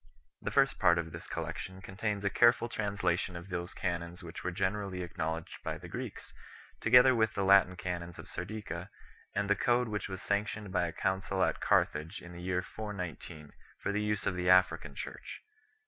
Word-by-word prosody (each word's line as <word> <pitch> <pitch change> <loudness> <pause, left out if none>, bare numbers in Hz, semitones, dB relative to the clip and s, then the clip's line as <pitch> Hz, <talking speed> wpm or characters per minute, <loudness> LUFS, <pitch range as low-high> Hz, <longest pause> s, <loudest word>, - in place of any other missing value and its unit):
The - - -2
first - - +3
part 85 0 +5
of 80 -1 -2
this - - -8
collection 95 0 -5
contains 100 +2 -3
a 100 - +2
careful 120 +1 +5
translation 100 -5 -1
of 85 +2 -8
those 85 0 -4
canons 85 0 -3
which 85 -1 -8
were 90 - 0
generally 95 0 -2
acknow 80 -1 -2
ledged 85 0 -9
by - - -2
the - - -10
Greeks, - - -6 0.5
together 125 +3 +7
with 110 -1 +2
the 100 - 0
Latin 95 -1 +6
canons 85 -1 -4
of - - -9
Sardica, 95 -2 -5 0.5
and 100 0 +1
the 100 - +4
code 120 +2 +2
which 105 -1 -3
was 95 0 -6
sanctioned 105 0 -1
by 90 -2 +2
a - - -4
council 95 +2 0
at - - 0
Carthage 80 +6 +2
in 90 0 -11
the 85 - -8
year 90 0 0
41 100 -6 -5
9 75 -2 -11 0.3
for 100 - -2
the 105 +1 0
use 105 -1 0
of 100 - +1
the 90 0 0
African 90 0 +4
Church. - - -7
95 Hz, 195 wpm, -32 LUFS, 85-105 Hz, 0.5 s, together